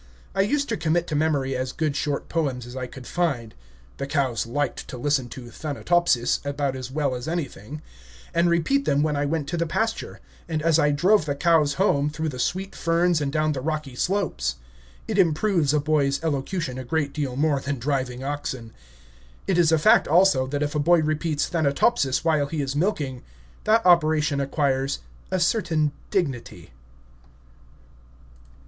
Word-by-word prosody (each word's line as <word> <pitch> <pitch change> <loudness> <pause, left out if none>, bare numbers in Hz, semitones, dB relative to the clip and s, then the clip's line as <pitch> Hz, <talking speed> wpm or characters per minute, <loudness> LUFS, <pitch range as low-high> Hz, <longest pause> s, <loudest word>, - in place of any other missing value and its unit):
I 195 - +2
used 280 +8 +1
to 225 - -1
commit 170 +1 +1
to 150 - -2
memory 145 -3 +1
as 130 0 -2
good 155 -1 -1
short 145 -1 -2
poems 135 -7 -2
as 120 +1 -10
I 130 -1 -4
could 125 0 -11
find 140 -11 -1 0.4
(the 140 - -4
cows 135 -6 0
liked 145 +4 -2
to 130 - -7
listen 135 -1 0
to 120 -2 -9
"Thanatopsis" 155 -2 +1
about 140 -1 -2
as 130 -1 -6
well 140 -1 -1
as 125 +2 -5
anything), 150 - -5 0.5
and 170 +1 +3
repeat 220 - +1
them 145 +1 +2
when 155 -1 0
I 145 0 0
went 150 -1 -2
to 175 - -2
the 170 0 0
pasture, 225 +6 -2 0.3
and 155 -2 -2
as 165 -1 +4
I 150 - +4
drove 175 +5 +3
the 145 - -1
cows 155 -1 +3
home 150 -7 +2
through 155 +1 -3
the 130 -3 -7
sweet 190 +8 -2
ferns 170 0 +2
and 140 -1 -1
down 155 +1 +1
the 135 -3 -3
rocky 155 -2 -3
slopes. 165 - -1 0.5
It - - -1
improves 165 -2 +2
a 150 - +2
boy's 140 -2 +1
elocution 145 -2 -2
a - - -5
great 145 +2 -1
deal 140 -5 -3
more 145 0 +2
than 140 +1 -3
driving 130 -1 -2
oxen. 135 -5 -4 0.7
It 185 -2 +1
is 165 -2 +4
a 160 - +5
fact, 155 - +5
also, 160 -5 +4
that 145 +2 -1
if 145 - -2
a 150 - 0
boy 165 +2 +4
repeats 155 0 0
"Thanatopsis" 145 - +1
while 155 -3 +2
he 150 0 -2
is 135 0 -3
milking, 145 -7 -1 0.4
that 220 0 +3
operation 155 -4 +4
acquires 135 -1 0 0.3
a 185 - 0
certain 170 -5 +1 0.2
dignity. 140 - -3
150 Hz, 175 wpm, -24 LUFS, 135-165 Hz, 0.7 s, a